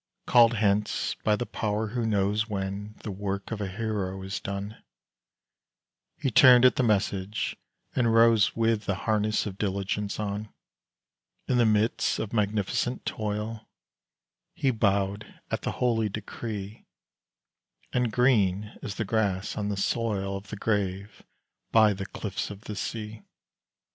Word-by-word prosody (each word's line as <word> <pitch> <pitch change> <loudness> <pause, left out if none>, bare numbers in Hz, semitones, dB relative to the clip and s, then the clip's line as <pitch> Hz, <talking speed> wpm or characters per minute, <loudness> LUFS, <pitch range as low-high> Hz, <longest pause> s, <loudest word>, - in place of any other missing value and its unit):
Called 120 -1 +6
hence 105 -1 +1
by 105 - +3
the 120 - -3
Power 105 0 -2
who 120 0 -1
knows 105 +1 +1
When 100 +1 -4
the 105 - -4
work 100 +1 -4
of 110 -2 -3
a 100 - -1
hero 100 -2 -3
is 95 +1 -4
done, 100 +2 -5 1.4
He 135 -4 -1
turned 125 +1 +8
at 125 - +6
the - - +2
message, 100 -3 0 0.4
and 120 -3 +3
rose 115 -2 +5
With 115 -2 +1
the 100 - 0
harness 110 0 +1
of 100 -2 -6
diligence 100 +1 -2
on. 105 0 -3 1.0
In 125 - +2
the 120 - +5
midst 110 +1 +2
of 110 - -4
magnificent 105 +3 0
toil, 110 +1 -4 0.9
He 135 - +2
bowed 100 -2 0
at - - -1
the - - -2
holy 115 -3 +1
decree; 105 0 -6 1.1
And 125 -2 +1
green 105 -4 +2
is 105 - -5
the 110 - -2
grass 100 -2 0
on 105 -1 -2
the 100 - -2
soil 100 -2 -1
Of 100 +1 -7
the - - -6
grave 100 -1 -2 0.5
by 110 -2 +6
the 95 0 -6
cliffs 100 -1 -4
of 100 -1 -9
the 105 - -7
sea. 105 +1 -5
105 Hz, 145 wpm, -27 LUFS, 100-115 Hz, 1.4 s, turned